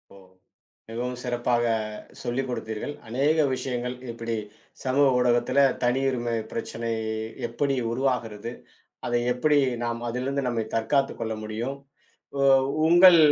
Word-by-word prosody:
ஓ! -, -, -14 dB, 0.7 s
மிகவும் 125 Hz, +2 st, -3 dB
சிறப்பாகச் 120 Hz, -3 st, -1 dB
சொல்லிக் 130 Hz, +2 st, -2 dB
கொடுத்தீர்கள். 115 Hz, +3 st, -4 dB
அநேக 140 Hz, +7 st, +2 dB, 0.2 s
விஷயங்கள் 125 Hz, -1 st, -3 dB, 0.2 s
இப்டி 115 Hz, 0 st, -3 dB, 0.5 s
சமூக 135 Hz, +2 st, +4 dB
ஊடகத்துல 125 Hz, +2 st, +2 dB, 0.2 s
தனி 120 Hz, +2 st, +2 dB
உரிமை 120 Hz, -2 st, -1 dB, 0.2 s
பிரச்சனை 115 Hz, 0 st, -4 dB, 0.6 s
எப்டி 135 Hz, +4 st, 0 dB, 0.2 s
உருவாகிறது, 120 Hz, -4 st, -1 dB, 0.5 s
அதை 120 Hz, 0 st, +1 dB
எப்டி 145 Hz, +4 st, +3 dB, 0.3 s
நாம் 115 Hz, 0 st, -2 dB
அதிலிருந்து 130 Hz, +3 st, -2 dB
நம்மைத் 115 Hz, -2 st, -2 dB
தற்காத்துக் 135 Hz, +5 st, +1 dB
கொள்ள 110 Hz, 0 st, -2 dB
முடியும், 115 Hz, +5 st, -3 dB, 0.6 s
உ -, -, -1 dB, 0.5 s
உங்கள் 175 Hz, +1 st, +8 dB
120 Hz, 115 wpm, -26 LUFS, 115-135 Hz, 0.7 s, உங்கள்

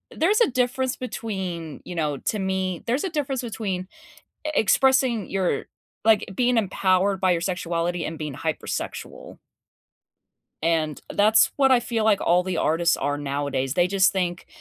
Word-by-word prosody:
there's 405 Hz, +8 st, +2 dB
a 470 Hz, -, +5 dB
difference 250 Hz, +1 st, 0 dB
between, 190 Hz, -, -5 dB
you 180 Hz, -, -7 dB
know 150 Hz, -4 st, -1 dB
to 215 Hz, -, -2 dB
me, 190 Hz, -2 st, -2 dB
there's 250 Hz, +5 st, 0 dB
a 380 Hz, -, -1 dB
difference 280 Hz, -5 st, -2 dB
between 210 Hz, -6 st, -4 dB, 0.6 s
e -, -, -1 dB
expressing 260 Hz, -2 st, +3 dB
your 185 Hz, -7 st, 0 dB, 0.4 s
like, 220 Hz, -2 st, +4 dB
being 245 Hz, +3 st, +2 dB
empowered 190 Hz, -1 st, +1 dB
by 185 Hz, -, +3 dB
your 170 Hz, -, 0 dB
sexuality 175 Hz, -1 st, -2 dB
and 160 Hz, 0 st, -6 dB
being 150 Hz, -3 st, -5 dB
hypersexual -, -, -5 dB, 1.2 s
and 160 Hz, -2 st, 0 dB
that's 215 Hz, +2 st, +5 dB
what 270 Hz, -2 st, +4 dB
I 255 Hz, -2 st, +5 dB
feel, 225 Hz, -1 st, -2 dB
like, 215 Hz, -2 st, +3 dB
all 175 Hz, +1 st, +3 dB
the 180 Hz, -1 st, -3 dB
artists 165 Hz, +2 st, +2 dB
are 145 Hz, +1 st, -1 dB
nowadays; 140 Hz, -2 st, -2 dB
they 175 Hz, 0 st, +3 dB
just 190 Hz, 0 st, +3 dB
think 175 Hz, -2 st, -2 dB
190 Hz, 155 wpm, -24 LUFS, 170-235 Hz, 1.2 s, a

